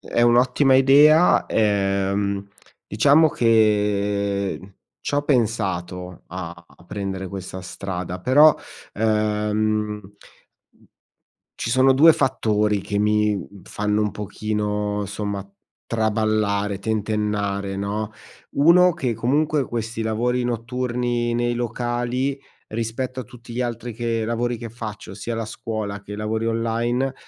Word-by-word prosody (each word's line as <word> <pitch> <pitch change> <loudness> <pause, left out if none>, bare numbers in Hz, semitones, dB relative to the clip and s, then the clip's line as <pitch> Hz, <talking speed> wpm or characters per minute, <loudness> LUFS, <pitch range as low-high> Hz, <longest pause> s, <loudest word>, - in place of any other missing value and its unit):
è 120 - -1
un'ottima 125 +3 +4
idea, 145 +5 +6
ehm, 100 -1 0 0.4
diciamo 145 +9 +4
che 105 -4 +1 0.4
c'ho 145 - 0
pensato 95 - -1
a 85 -1 -7
a 85 - -21
prendere 95 0 -4
questa 95 -1 -7
strada, 90 -1 -5
però, 145 +9 +6 0.4
ehm, 105 -1 0
mhmm, 105 0 0 1.5
ci - - -4
sono 130 +3 +5
2 155 +5 +7
fattori, 105 -6 +1
che 100 +1 -3
mi, 105 0 +2
mhmm, 100 0 -9
fanno 105 +2 -1
un 105 - -1
pochino 105 0 -2
somma 100 0 -4 0.4
traballare, 110 -2 0
tentennare, 105 -2 -1
no. 105 +2 -3 0.4
1 170 +4 +5
che 130 -8 -2
comunque, 145 +5 +1
questi 115 -1 -4
lavori 120 +3 0
notturni 120 0 -1
nei 120 0 0
locali, 120 +3 -2 0.3
rispetto 115 +4 -4
a - - -4
tutti 120 +1 -14
gli 120 - -4
altri 120 -1 -3
che 115 0 -2
lavori 120 +2 -1
che 115 0 -7
faccio, 110 -4 -8
sia 110 +4 -5
la 115 - -2
scuola 110 -2 -5
che 105 +1 -8
lavori 110 +2 -2
online, 115 +3 0
110 Hz, 115 wpm, -22 LUFS, 100-120 Hz, 1.5 s, 2